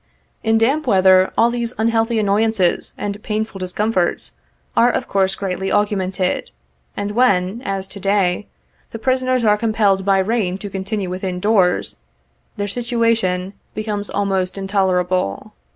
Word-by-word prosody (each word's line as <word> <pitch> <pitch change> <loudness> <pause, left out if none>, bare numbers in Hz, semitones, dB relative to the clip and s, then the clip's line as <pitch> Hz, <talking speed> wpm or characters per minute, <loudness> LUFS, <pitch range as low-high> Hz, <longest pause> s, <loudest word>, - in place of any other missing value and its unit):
In 225 0 +2
damp 270 +7 +1
weather, 190 -3 +5
all 235 +1 +4
these 240 0 -2
unhealthy 225 +1 +1
annoyances 210 -2 +1
and 205 0 -4
painful 215 -2 -3
discomforts 185 0 -1 0.4
are 240 - +5
of - - -2
course 195 -1 +1
greatly 190 -1 -3
augmented, 190 -3 0 0.5
and 205 0 -2
when, 210 -2 +2
as 195 -3 -3
to 200 - -7
day, 195 -1 +1 0.4
the - - -7
prisoners 255 +1 +1
are 210 -1 +3
compelled 210 -4 +2
by 195 0 +3
rain 190 -2 0
to 200 0 -8
continue 195 0 -3
within 185 0 -3
doors, 190 -3 +2 0.6
their 205 0 -2
situation 225 -5 0 0.2
becomes 210 -1 -3
almost 195 -2 -1
intolerable. 185 - 0
205 Hz, 135 wpm, -19 LUFS, 190-225 Hz, 0.6 s, weather